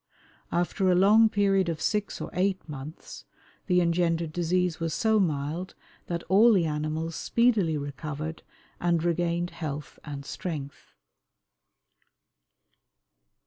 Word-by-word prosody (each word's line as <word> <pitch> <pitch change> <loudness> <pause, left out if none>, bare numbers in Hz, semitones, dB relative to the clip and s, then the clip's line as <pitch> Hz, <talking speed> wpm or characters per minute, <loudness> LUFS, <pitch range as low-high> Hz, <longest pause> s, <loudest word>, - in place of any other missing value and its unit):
After 175 +2 +1
a 180 - +4
long 215 +4 +6
period 195 -3 +2
of 160 -2 -3
six 210 +5 -1
or - - -6
eight 190 0 0
months 150 +1 -9 0.4
the 180 -2 +4
engendered 170 -2 +1
disease 175 0 0
was 165 -1 -2
so 220 +1 +3
mild 160 +1 -2 0.3
that 170 -1 -3
all 210 +6 +5
the 180 -5 +3
animals 155 +2 -2
speedily 220 -10 +2
recovered 150 +2 -5 0.4
and 170 -2 +1
regained 175 0 0
health 150 -3 -6
and 140 -2 -7
strength. 145 -3 -6
170 Hz, 115 wpm, -27 LUFS, 155-185 Hz, 0.4 s, long